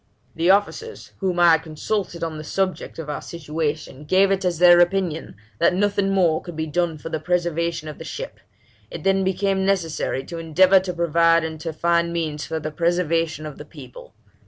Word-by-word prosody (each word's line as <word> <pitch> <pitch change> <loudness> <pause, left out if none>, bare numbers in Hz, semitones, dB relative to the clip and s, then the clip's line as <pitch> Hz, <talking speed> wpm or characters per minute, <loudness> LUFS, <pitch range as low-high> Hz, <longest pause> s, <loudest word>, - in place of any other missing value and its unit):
'The 165 +2 0
officers, 205 - 0
whom 185 -3 -1
I 175 -1 +7
had 160 -1 +4
consulted 170 +3 -3
on 160 -2 -4
the - - -7
subject 190 +3 -2
of 165 -2 -6
our 150 - -4
situation, 155 -3 -4
gave 190 +5 +3
it 195 0 0
as 180 -2 0
their 175 0 +7
opinion 175 -2 0 0.2
that - - +3
nothing 200 0 +1
more 175 -5 +2
could 175 -3 -9
be 160 0 -2
done 165 +1 -1
for 160 - -8
the 160 - -2
preservation 170 -1 -1
of 150 - -8
the - - -7
ship; - - -7 0.5
it 165 - -8
then 195 0 +2
became 190 +1 0
necessary 170 -8 -1
to 170 +4 -7
endeavour 185 +4 +5
to 185 -1 -4
provide 170 0 +3
and 160 -1 -5
to 165 +1 -4
find 170 +1 +1
means 155 -3 -3
for 160 0 -3
the 155 0 -5
preservation 165 -1 0
of 150 -2 -8
the - - -7
people. 130 -7 -13
170 Hz, 195 wpm, -22 LUFS, 160-185 Hz, 0.5 s, I